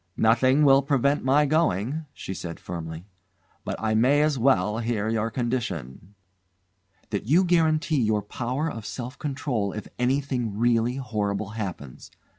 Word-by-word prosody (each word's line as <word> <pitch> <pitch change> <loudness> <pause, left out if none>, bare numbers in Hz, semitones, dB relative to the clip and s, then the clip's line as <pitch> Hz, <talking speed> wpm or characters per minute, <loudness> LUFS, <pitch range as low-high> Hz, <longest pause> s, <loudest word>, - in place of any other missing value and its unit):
"Nothing 130 +6 +4
will 135 0 +6
prevent 140 +1 +1
my 140 +3 +4
going," 150 - 0
she 95 - -7
said 85 -3 -7
firmly; 80 0 -7 0.6
"but - - -3
I 110 0 -1
may 130 +7 +4
as 155 -1 +2
well 110 -4 +2
hear 115 -2 -1
your 110 0 0
condition." 105 - -4 1.0
"That 105 0 -3
you 165 +8 +5
guarantee 160 -4 +2
your 105 -2 +1
power 125 +8 -3
of 115 -8 -5
self 120 +6 -6
control 135 -8 -2
if 105 - -6
anything 125 -4 0
really 120 +1 +2
horrible 105 -6 -2
happens. 95 - -7
120 Hz, 140 wpm, -25 LUFS, 105-140 Hz, 1.0 s, will